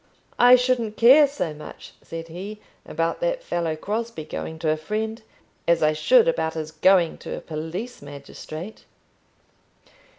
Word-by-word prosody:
"I 245 +1 +8
shouldn't 245 -4 0
care 275 +6 +7
so 225 - -4
much," 150 0 -11
said 165 0 -8
he, 195 +6 -7 0.3
"about 165 +1 -2
that - - -1
fellow 170 - -2
Crosbie 215 0 -4
going 160 +1 -6
to 160 -1 0
a - - +2
friend, 215 +8 -4 0.5
as 170 -1 +3
I 155 0 +4
should 470 - +4
about 160 - 0
his 155 -1 -5
going 170 +1 +3
to - - -6
a - - -5
police 165 +10 -6
magistrate." 145 +6 -9
175 Hz, 145 wpm, -24 LUFS, 160-235 Hz, 0.5 s, I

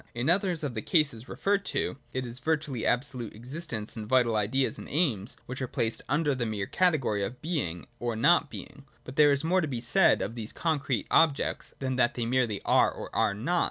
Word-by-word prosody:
In 125 +7 +2
others 180 -3 +1
of 140 -4 -2
the 110 - -3
cases 140 - +1
referred 200 0 0
to, - - -1 0.2
it 130 -1 -3
is 120 +1 -6
virtually 150 -5 -1
absolute 125 -3 -1
existences 120 -2 -5
and 110 -2 -6
vital 120 -2 +3
ideas 115 +6 0
and - - -9
aims, 125 - 0
which 130 +1 -6
are 130 - -1
placed 115 -1 -1
under 150 -1 +2
the 125 -2 -2
mere 105 -3 -2
category 135 - +1
of 120 +6 -5
Being 145 - -2
or 120 -1 -2
not 150 +6 +4
Being. 140 0 -10 0.2
But 130 - -9
there 150 0 +6
is 140 +1 +1
more 180 +3 +2
to 160 - -1
be 125 -5 -3
said 120 0 +3
of 105 - -4
these 115 -2 -7
concrete 140 -8 -1
objects, 160 -4 +2
than 130 -1 -2
that 120 -1 +2
they 120 - -2
merely 120 -4 0
are - - +4
or - - -9
are 100 - +2
not. 165 +12 0
130 Hz, 210 wpm, -28 LUFS, 115-150 Hz, 0.2 s, there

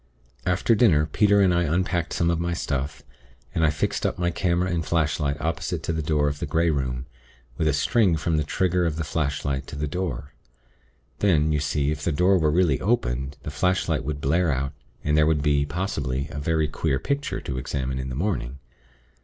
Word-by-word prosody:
"After 90 +6 +3
dinner, 95 -10 +4
Peter 100 +6 +3
and 95 -2 +4
I 85 - +2
unpacked 85 +1 0
some 85 0 +2
of 85 - 0
my 85 0 -1
stuff, 70 -3 -3 0.5
and 80 - 0
I 80 - +5
fixed 75 0 -1
up - - 0
my 85 0 0
camera 90 +1 0
and 85 -1 0
flashlight 75 -3 0
opposite 80 +1 -2
to 85 - -1
the 80 - -1
door 75 -1 +1
of 70 0 -2
the - - -3
Grey 85 +1 +2
Room, 65 -3 -2 0.5
with 80 - +2
a 75 - +3
string 90 +4 +2
from 80 +1 0
the 75 - +1
trigger 90 +3 +1
of 80 - -2
the 80 - -2
flashlight 70 -3 -2
to - - -7
the 75 +1 -2
door. 70 -5 -4 0.9
Then, 80 -6 +3
you 75 - +1
see, 75 0 0
if 75 -1 -4
the 85 - +1
door 90 +5 +3
were 80 -2 +2
really 80 -3 +2
opened, 70 - 0
the - - -5
flashlight 90 +5 0
would 70 +1 -4
blare 80 +4 +2
out, 70 +1 -2 0.3
and 75 +1 +1
there 75 0 +4
would 75 -3 +1
be, 70 -1 +2
possibly, 70 -6 -2
a 75 - -5
very 80 +1 +1
queer 75 -2 -1
picture 140 - -2
to 65 -2 -4
examine 65 0 -3
in 65 0 -4
the 65 - -5
morning. 70 -7 -2
75 Hz, 205 wpm, -25 LUFS, 70-85 Hz, 0.9 s, I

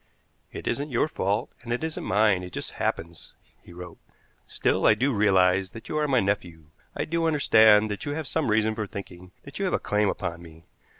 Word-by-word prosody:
"It - - -8
isn't 145 +2 -2
your 125 +3 +1
fault, 100 -7 -2
and 120 -1 -8
it 120 +5 -2
isn't 160 -1 -4
mine. 100 -1 +2
It 90 -1 -9
just - - -6
happens," 85 0 -4 0.3
he - - -16
wrote. 90 -1 -10 0.5
"Still, - - +1
I 105 - +6
do 130 +5 0
realize 95 -3 +2
that 115 - -11
you - - -2
are 150 - +1
my 130 -3 +3
nephew, 85 -6 -3 0.2
I - - -2
do 165 0 0
understand 110 -8 +5
that 105 - -5
you 145 - -3
have 160 +1 -4
some 155 -1 -1
reason 110 0 +2
for 110 -1 -4
thinking 90 -3 -10
that 140 +4 -10
you 200 - 0
have 185 - 0
a - - -1
claim 105 -1 +1
upon 85 0 -4
me. 80 -1 -15
105 Hz, 215 wpm, -26 LUFS, 90-135 Hz, 0.5 s, I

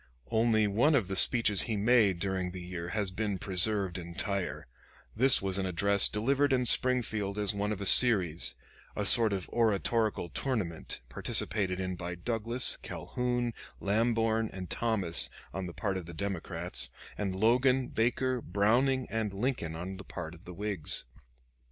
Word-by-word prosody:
Only 110 -1 +2
one 120 +10 +2
of 115 -9 +1
the 95 - -4
speeches 105 -2 +4
he 110 - -1
made 105 -4 +3
during 95 -1 -2
the 90 +1 -8
year 90 -1 -6
has 100 -2 -1
been 100 0 -3
preserved 95 0 +1
entire: 90 +3 -3 0.5
this 130 -1 +4
was 95 0 -1
an 95 - -2
address 100 +2 +4
delivered 135 +6 0
in 125 -1 +1
Springfield 110 -6 +1
as 105 0 +2
one 105 +1 -2
of 105 - -4
a 100 - -4
series 95 -8 +5 0.4
a 105 - -2
sort 115 +1 +7
of 95 -3 -2
oratorical 110 -3 0
tournament 95 - -4
participated 95 - +1
in 95 -1 -3
by 90 0 -6
Douglas, 115 +6 +1
Calhoun, 120 -1 -3 0.3
Lamborn, 115 +1 0
and 95 -2 -8
Thomas 100 -8 0 0.2
on 95 +1 -4
the - - -7
part 100 -1 -3
of 90 -3 -8
the 85 - -10
Democrats, 85 -7 -2 0.3
and 100 -3 -3
Logan, 125 +5 +2
Baker, 125 +2 -1
Browning, 120 +8 +1
and 110 -2 -2
Lincoln 100 -8 -3
on 90 +3 -6
the 100 - -10
part 85 -4 -8
of 85 - -16
the 90 - -9
Whigs. 100 -6 -2
100 Hz, 155 wpm, -30 LUFS, 95-115 Hz, 0.5 s, sort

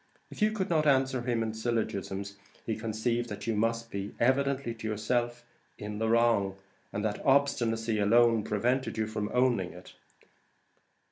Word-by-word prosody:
If - - -10
you 215 0 +4
could 205 -4 -2
not 155 -2 +3
answer 130 -2 +3
him 120 -2 0
in 110 -1 -3
syllogisms, 100 -3 -2 0.3
he 110 - -1
conceived 115 +2 -2
that 105 -1 -6
you 115 - 0
must 115 +2 -1
be, 100 0 -5
evidently 135 0 +1
to 115 -1 -6
yourself, 120 +3 -1 0.3
in 105 0 -6
the 110 0 0
wrong, 115 -4 +3 0.3
and 105 +1 -3
that 105 -1 -2
obstinacy 115 -5 +2
alone 115 +1 +4
prevented 120 +5 0
you 110 - +1
from 105 -1 -3
owning 120 -9 +1
it. 90 +2 -13
115 Hz, 155 wpm, -29 LUFS, 105-125 Hz, 0.3 s, you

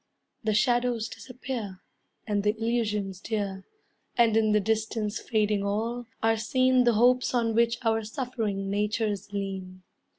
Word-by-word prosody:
The 215 -1 +1
shadows 240 -1 +2
disappear, 245 -7 -6 0.5
And 205 -1 0
the 210 +2 +1
illusions 210 -4 -1
dear; 200 -4 -3 0.5
And 230 -2 +4
in 220 -1 +3
the 210 - +4
distance 220 0 -1
fading 210 -3 +1
all, 225 +4 -2 0.2
are 225 0 +3
seen 255 +3 +3
The 240 - +5
hopes 250 +3 +3
on 230 -2 +1
which 235 +1 +3
our 225 0 +2
suffering 215 -4 -3
natures 210 -1 -1
lean. 190 -2 -5
220 Hz, 135 wpm, -27 LUFS, 205-235 Hz, 0.5 s, The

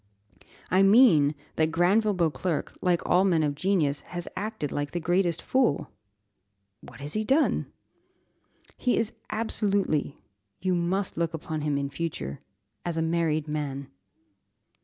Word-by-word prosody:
"I 185 +2 +5
mean, 195 - +6 0.2
that 160 0 +2
Granville 195 +5 +3
Beauclerc, 170 -1 -1
like 180 -2 +1
all 180 +2 +4
men 170 -5 +3
of 145 -1 0
genius, 150 -4 +1
has 175 -1 -7
acted 205 -6 -3
like 145 0 -3
the 175 - -1
greatest 175 0 +1
fool." 255 - +1 0.9
"What - - -13
has 145 +1 -4
he 215 - 0
done?" 275 +8 +1 1.1
"He 250 - +1
is 225 -1 0 0.2
absolutely 200 -9 0 0.4
you 185 -1 0
must 180 +2 -1
look 165 -1 -1
upon 160 -1 -4
him 145 -1 0
in 140 0 -2
future 70 - -4 0.4
as 170 -2 -3
a 160 - +1
married 160 -2 0
man." 140 -2 -4
170 Hz, 135 wpm, -27 LUFS, 150-195 Hz, 1.1 s, mean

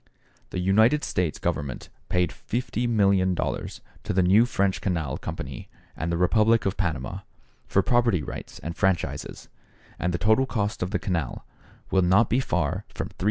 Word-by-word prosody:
The - - -5
United 110 +11 +4
States 90 -4 -1
Government 70 -3 -3 0.2
paid 90 -3 +1
$50,000,000 100 -6 0 0.2
to - - -2
the 95 0 +3
new 100 +7 +5
French 100 -5 0
Canal 80 -8 -1
Company - - -6 0.3
and 80 +2 -3
the 85 - 0
Republic 110 +5 +3
of 95 0 0
Panama, 75 -10 -2 0.5
for - - +2
property 115 -9 +2
rights - - -7
and 85 +1 -4
franchises, 95 -4 -1 0.5
and 90 - 0
the 85 - -1
total 110 +7 +3
cost 105 -4 -2
of 90 - -1
the 105 - 0
canal 85 -8 -3 0.5
will 95 - +4
not 95 +5 +4
be 125 - +3
far 135 - -1
from - - -3
$375,000,000. - - -20
95 Hz, 160 wpm, -26 LUFS, 90-110 Hz, 0.5 s, new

